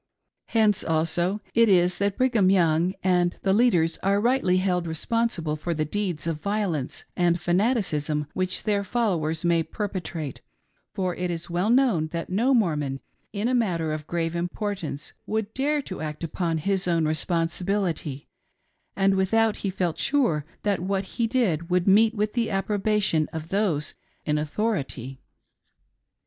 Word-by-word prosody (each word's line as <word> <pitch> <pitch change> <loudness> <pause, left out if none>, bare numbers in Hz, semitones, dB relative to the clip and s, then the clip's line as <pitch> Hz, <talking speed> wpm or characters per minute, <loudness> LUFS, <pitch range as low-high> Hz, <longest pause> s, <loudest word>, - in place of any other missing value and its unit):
Hence 215 -3 +2
also 170 +5 0
it 230 -1 +5
is 180 -1 +3
that 200 -1 0
Brigham 240 -7 +3
Young 175 -1 +3
and 180 -1 +2
the 190 - +3
leaders 185 -8 +3
are 200 +1 +2
rightly 235 -5 +2
held 180 -2 0
responsible 165 -1 -1
for 165 +2 -3
the 155 0 0
deeds 180 -2 -2
of 160 -2 -3
violence 200 -10 -2
and 175 -1 +2
fanaticism 175 - 0
which 185 0 -1
their 205 -2 +1
followers 175 -8 -1
may 170 -1 +3
perpetrate; 170 - -5 0.5
for 185 -3 -1
it 180 +1 -3
is 170 0 -4
well 180 +5 0
known 235 -11 +3
that 165 +2 -5
no 230 +8 +2
Mormon, 150 - 0 0.3
in 210 +2 -1
a 255 - +1
matter 170 -10 0
of 155 -1 -6
grave 165 0 -2
importance, 175 -3 -4
would 220 0 -2
dare 290 +2 0
to 185 - -7
act 150 +1 -5
upon 165 0 -1
his 190 +3 -1
own 165 -2 +2
responsibility 165 -1 -1 0.7
and 195 0 +3
without 215 +3 +2
he 200 - -2
felt 180 -3 -2
sure 235 - +1 0.2
that 205 -2 +1
what 190 +2 -1
he 230 +4 -2
did 190 - 0
would 180 +1 +1
meet 220 +3 +5
with 210 0 -1
the 235 -2 0
approbation 195 -4 +1
of 160 0 -6
those 190 -7 0 0.3
in 150 0 +1
authority. 145 - -3
180 Hz, 150 wpm, -25 LUFS, 165-210 Hz, 0.7 s, it